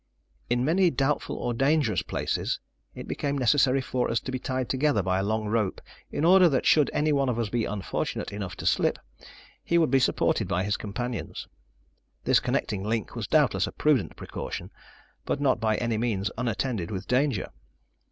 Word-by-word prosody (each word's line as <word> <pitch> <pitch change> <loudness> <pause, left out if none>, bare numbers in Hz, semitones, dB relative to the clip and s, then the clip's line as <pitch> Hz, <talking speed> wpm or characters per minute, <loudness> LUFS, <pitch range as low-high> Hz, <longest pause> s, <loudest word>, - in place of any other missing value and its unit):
In 120 +1 +1
many 175 +4 +4
doubtful 135 +1 -1
or 120 - -2
dangerous 135 - +2
places, - - -2 0.4
it - - -8
became 140 0 -2
necessary 135 +1 +3
for 125 -1 -1
us 115 - +1
to - - -5
be 130 - -3
tied 130 -1 -2
together 135 -6 +1
by 95 +1 +1
a - - 0
long 110 +1 -1
rope 105 -2 0 0.3
in 155 - -1
order 180 0 +7
that 135 -4 0
should 150 -3 +5
any 150 0 +1
one 140 -2 +2
of 120 - -1
us 115 -3 -1
be 120 0 0
unfortunate 100 0 -3
enough 95 -3 -5
to - - -8
slip, - - +2 0.7
he 170 - +2
would 160 -6 +3
be 135 - +5
supported 125 - +1
by 90 +2 0
his 100 +1 0
companions. 120 +2 -5 0.8
This - - +4
connecting 95 -2 -1
link 110 0 -2
was - - -4
doubtless - - +3
a - - -5
prudent 130 - +1
precaution, - - -6 0.5
but - - -2
not 135 -4 +2
by 110 -1 +1
any 115 -2 -1
means 105 -4 -1
unattended 115 -5 -2
with 95 -3 -5
danger. 130 -4 +1
120 Hz, 180 wpm, -27 LUFS, 105-140 Hz, 0.8 s, order